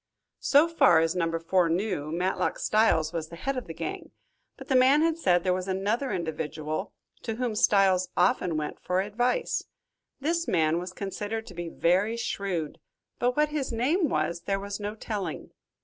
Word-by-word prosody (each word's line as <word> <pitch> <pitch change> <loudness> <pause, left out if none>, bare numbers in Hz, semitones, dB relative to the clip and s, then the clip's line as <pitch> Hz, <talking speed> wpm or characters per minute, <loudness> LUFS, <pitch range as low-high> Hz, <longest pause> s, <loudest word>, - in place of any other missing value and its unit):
So 295 +3 +5
far 330 - +5
as 165 +2 +1
Number 165 -2 0
Four 170 +1 +2
knew, 170 -4 -1
Matlock 180 +3 -1
Styles 175 -7 +2
was 160 -2 -4
the 170 - -9
head 270 +10 -3
of 250 -5 -5
the 165 - -6
gang, 390 +1 -5 0.5
but - - -11
the 265 - +1
man 265 +4 +5
had 330 -1 +2
said 180 - +2
there 185 - +2
was 185 +1 -3
another 205 +8 -1
individual, 160 0 -3 0.3
to 225 -2 -4
whom 245 -1 -2
Styles 190 -3 +3
often 180 -2 +2
went 150 -1 -4
for 180 +1 0
advice. 245 - -1 0.5
This 335 +4 -1
man 160 -1 +2
was 180 +1 -6
considered 205 +3 -4
to - - -11
be 175 -1 -5
very 190 +8 +1
shrewd, 195 -9 -3 0.4
but 245 +2 +1
what 300 0 +3
his 295 -4 -2
name 290 +9 +1
was 160 +3 -1
there 195 0 +1
was 200 +1 -5
no 205 +1 -4
telling. 210 -3 -5
195 Hz, 180 wpm, -27 LUFS, 170-245 Hz, 0.5 s, So